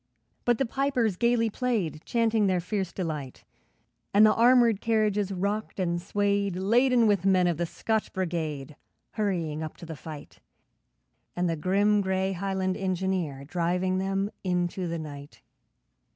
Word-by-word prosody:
But 240 Hz, -1 st, +3 dB
the 270 Hz, -, +1 dB
pipers 250 Hz, -5 st, 0 dB
gaily 235 Hz, +1 st, +2 dB
played, 205 Hz, -11 st, -1 dB
Chanting 225 Hz, -3 st, +2 dB
their 185 Hz, -1 st, +2 dB
fierce 190 Hz, 0 st, -3 dB
delight, 155 Hz, -8 st, -5 dB, 0.7 s
And 210 Hz, +1 st, +8 dB
the 215 Hz, -, +5 dB
armoured 235 Hz, -3 st, +4 dB
carriages 210 Hz, -3 st, +1 dB
rocked 200 Hz, +3 st, -2 dB
and 175 Hz, -2 st, 0 dB
swayed, 200 Hz, 0 st, 0 dB
Laden 235 Hz, +6 st, +3 dB
with 205 Hz, -4 st, +2 dB
men 190 Hz, -2 st, +4 dB
of 175 Hz, -3 st, +1 dB
the 170 Hz, 0 st, -1 dB
Scotch 220 Hz, +5 st, -2 dB
Brigade, 155 Hz, -6 st, -3 dB, 0.4 s
Hurrying 170 Hz, -8 st, -2 dB
up 155 Hz, -1 st, -6 dB
to -, -, -10 dB
the 160 Hz, -1 st, -7 dB
fight, 150 Hz, +1 st, -10 dB, 1.0 s
And 180 Hz, 0 st, 0 dB
the 165 Hz, -, 0 dB
grim, 200 Hz, +5 st, +2 dB
grey 190 Hz, 0 st, 0 dB
Highland 190 Hz, 0 st, -2 dB
engineer, 185 Hz, -7 st, -2 dB
Driving 180 Hz, +3 st, 0 dB
them 195 Hz, +1 st, -1 dB
into 180 Hz, 0 st, -1 dB
the 170 Hz, 0 st, -3 dB
night. 145 Hz, -2 st, -9 dB
190 Hz, 145 wpm, -27 LUFS, 170-210 Hz, 1.0 s, And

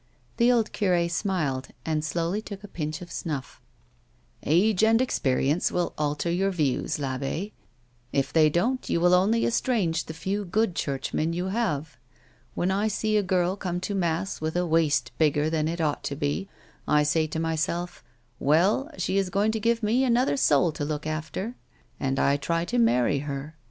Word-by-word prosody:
The 235 Hz, +1 st, +5 dB
old 230 Hz, -3 st, +2 dB
cure 180 Hz, -4 st, +2 dB
smiled 165 Hz, -8 st, -1 dB, 0.2 s
and 155 Hz, -1 st, 0 dB
slowly 170 Hz, +6 st, -1 dB
took 200 Hz, -2 st, -9 dB
a -, -, -8 dB
pinch 155 Hz, -1 st, -4 dB
of 175 Hz, -, -12 dB
snufiF. 150 Hz, -6 st, -5 dB, 0.4 s
" -, -, -38 dB
Age 190 Hz, +6 st, +3 dB
and 225 Hz, +1 st, +5 dB
experience 145 Hz, -, +1 dB
will 175 Hz, -1 st, -1 dB
alter 150 Hz, +2 st, -1 dB
your 190 Hz, +3 st, +1 dB
views, 150 Hz, -7 st, -1 dB
I'abbe; 135 Hz, +8 st, -3 dB, 0.6 s
if 140 Hz, -1 st, 0 dB
they 155 Hz, -2 st, +5 dB
don't 235 Hz, -, 0 dB
you -, -, +1 dB
will 175 Hz, +1 st, +4 dB
only 205 Hz, +6 st, +3 dB
estrange 205 Hz, -9 st, 0 dB
the 160 Hz, -, -7 dB
few 195 Hz, +5 st, -2 dB
good 205 Hz, +2 st, 0 dB
Churchmen 155 Hz, +3 st, -1 dB
you 180 Hz, +2 st, -2 dB
have. 160 Hz, -, -2 dB, 0.6 s
When 180 Hz, +2 st, 0 dB
I 200 Hz, +3 st, +1 dB
see 215 Hz, 0 st, 0 dB
a 210 Hz, -, +4 dB
girl 185 Hz, -1 st, +1 dB
come 180 Hz, -3 st, -3 dB
to 200 Hz, -, -3 dB
mass 175 Hz, -1 st, -1 dB
with 160 Hz, +1 st, -2 dB
a 180 Hz, 0 st, +1 dB
waist 150 Hz, -7 st, +2 dB
bigger 150 Hz, 0 st, +2 dB
than 155 Hz, -1 st, 0 dB
it 170 Hz, +2 st, -3 dB
ought 150 Hz, -3 st, -1 dB
to 140 Hz, -, -2 dB
be, 145 Hz, +7 st, -2 dB, 0.4 s
I 150 Hz, 0 st, +4 dB
say 155 Hz, +2 st, +1 dB
to 155 Hz, +1 st, -4 dB
myself 165 Hz, +2 st, -2 dB
— 120 Hz, +1 st, -39 dB
' 120 Hz, -, -39 dB
Well, 185 Hz, -, +3 dB
she 195 Hz, -, 0 dB
is 195 Hz, -2 st, -1 dB
going 200 Hz, +3 st, +1 dB
to 220 Hz, -, -2 dB
give 230 Hz, +1 st, +1 dB
me 230 Hz, +5 st, +2 dB
another 250 Hz, +1 st, +2 dB
soul 180 Hz, -, +3 dB
to 145 Hz, -, -5 dB
look 150 Hz, 0 st, -3 dB
after; 155 Hz, +9 st, -4 dB
' -, -, -34 dB
— -, -, -37 dB
and 135 Hz, 0 st, -1 dB
I 140 Hz, +1 st, +3 dB
try 165 Hz, +3 st, -1 dB
to 245 Hz, +6 st, -1 dB
marry 140 Hz, -, +3 dB
her. 145 Hz, +2 st, -5 dB
170 Hz, 190 wpm, -26 LUFS, 150-200 Hz, 0.6 s, The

